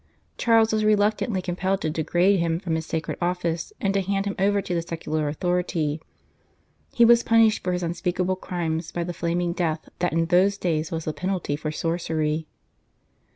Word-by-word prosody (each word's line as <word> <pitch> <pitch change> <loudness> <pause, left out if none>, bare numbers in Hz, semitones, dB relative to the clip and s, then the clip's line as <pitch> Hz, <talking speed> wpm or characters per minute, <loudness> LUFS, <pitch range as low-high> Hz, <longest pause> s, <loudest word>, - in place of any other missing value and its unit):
Charles 225 -1 +3
was 215 0 +1
reluctantly 210 -1 +2
compelled 185 +2 -1
to 155 - -1
degrade 175 +5 +2
him 165 -1 0
from 175 -3 -3
his 160 0 -2
sacred 160 0 -3
office, 175 - -1
and 195 -1 0
to 200 - +2
hand 195 +1 -1
him 200 - -1
over 200 +1 +3
to 195 - -3
the 170 - 0
secular 155 -2 -3
authority. 160 -1 -1 0.9
He 235 - +5
was 235 0 +6
punished 225 -2 +3
for 180 - 0
his 180 0 -1
unspeakable 180 +2 -1
crimes 165 -3 -3
by 175 - -2
the 175 +1 -4
flaming 170 +1 -1
death 160 -3 -2
that 175 - +1
in 165 +1 +1
those 185 +4 +3
days 160 -4 -1
was 165 -1 -4
the 155 - -2
penalty 185 -5 -2
for 155 +1 -4
sorcery. 160 -1 -1
175 Hz, 180 wpm, -24 LUFS, 165-195 Hz, 0.9 s, was